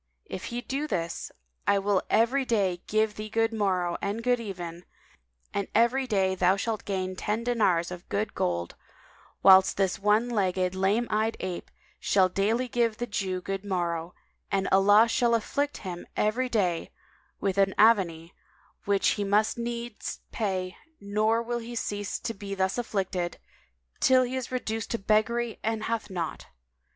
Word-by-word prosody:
If - - -6
he 240 +1 -4
do 275 +4 -3
this, 170 - -3 0.4
I 200 - +4
will 195 -1 +1
every 245 +5 +3
day 195 -8 0
give 215 0 +1
thee 215 0 -5
good 225 +1 +1
morrow 185 -5 0
and 205 +3 -2
good 245 0 +2
even, 175 -5 -6 0.7
and 200 -1 -1
every 245 +4 +3
day 190 -4 +2
thou 185 0 +3
shalt 220 +1 -3
gain 185 -2 -2
ten 210 +4 -2
dinars 190 -8 +1
of 180 -1 -9
good 210 +1 -1
gold; 85 -1 -2 0.7
whilst 190 0 +7
this 195 -1 +1
one 215 +4 +2
eyed, 185 -2 +1
lame 195 +5 +1
legged 220 0 0
ape 180 -2 -5 0.3
shall 190 -2 +3
daily 220 +7 0
give 235 -2 0
the 240 - -2
Jew 190 -4 -2
good 195 +1 -4
morrow, 175 -3 -2 0.4
and 195 -1 +1
Allah 205 +4 +6
shall 235 0 +2
afflict 285 +6 -1
him 175 -2 -6
every 245 +5 +1
day 185 -8 0 0.5
with 195 -1 0
an 195 -1 +3
avanie 180 -7 +3
[FN#199] - - -35
which 200 -1 +2
he 205 - 0
must 210 +3 +2
needs 235 -1 -5
pay, 185 -4 -2 0.2
nor 215 +3 +1
will 240 +1 -2
he 235 +1 -7
cease 205 -3 -3
to 230 - -3
be 200 -1 -6
thus 190 +4 0
afflicted 190 -6 -2 0.6
till 260 -1 +5
he 250 +1 -3
is 260 -2 -4
reduced 225 -3 -3
to 230 - -1
beggary 220 +3 +1
and 220 -1 -1
hath 230 -2 -2
naught. 170 -4 -4
205 Hz, 160 wpm, -27 LUFS, 190-230 Hz, 0.7 s, whilst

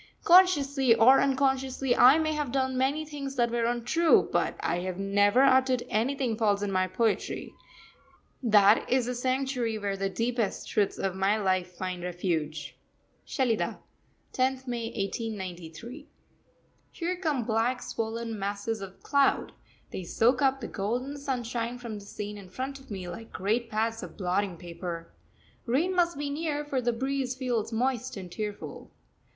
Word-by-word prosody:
Consciously 285 -9 +5
or 240 +4 +7
unconsciously, 265 -1 +1
I 260 +5 +7
may 310 -1 0
have 295 -4 -2
done 260 0 0
many 275 +4 +1
things 280 -2 -6
that 240 -2 +2
were 235 -1 0
untrue, 245 +8 +3
but - - +1
I 175 - 0
have 180 0 -4
never 205 +5 +3
uttered 260 -2 +4
anything 245 +2 0
false 205 -3 +2
in 200 - -1
my 185 -1 +1
poetry 220 +4 -1 0.9
that 210 -3 +5
is 255 -1 +2
the 250 - -2
sanctuary 255 -2 -1
where 200 -2 -2
the 195 0 -1
deepest 230 0 -1
truths 205 -2 0
of 190 -1 -2
my 195 +3 +2
life 185 -3 0
find 185 -1 -4
refuge. 170 -4 -3 0.5
SHELIDAH, 245 -5 0 0.6
10th 260 0 0
May 240 -2 -3
1893. 205 - -5 0.8
Here 350 +1 -3
come 310 -8 -1
black, 230 +3 0
swollen 225 -1 -4
masses 205 +2 -3
of 195 -1 -10
cloud; 280 -1 +2 0.4
they 185 - -5
soak 240 +9 +2
up 270 -1 +2
the 230 - -4
golden 245 +8 -3
sunshine 245 -4 -3
from 230 -4 -6
the 200 - -13
scene 205 0 -6
in 190 -2 -12
front 265 +7 -5
of 270 - -18
me 190 -4 -5
like 225 +5 -8
great 225 +5 -1
pads 225 +1 -1
of - - -9
blotting 185 -1 -1
paper. 170 -1 -7 0.6
Rain 320 +10 +1
must 345 -3 +2
be 285 0 -3
near, 295 -1 -2
for 275 -3 -1
the 240 0 +1
breeze 260 +1 -2
feels 245 -4 -2
moist 250 +1 -1
and 180 -2 -8
tearful. 210 +2 -6
235 Hz, 155 wpm, -28 LUFS, 200-265 Hz, 0.9 s, or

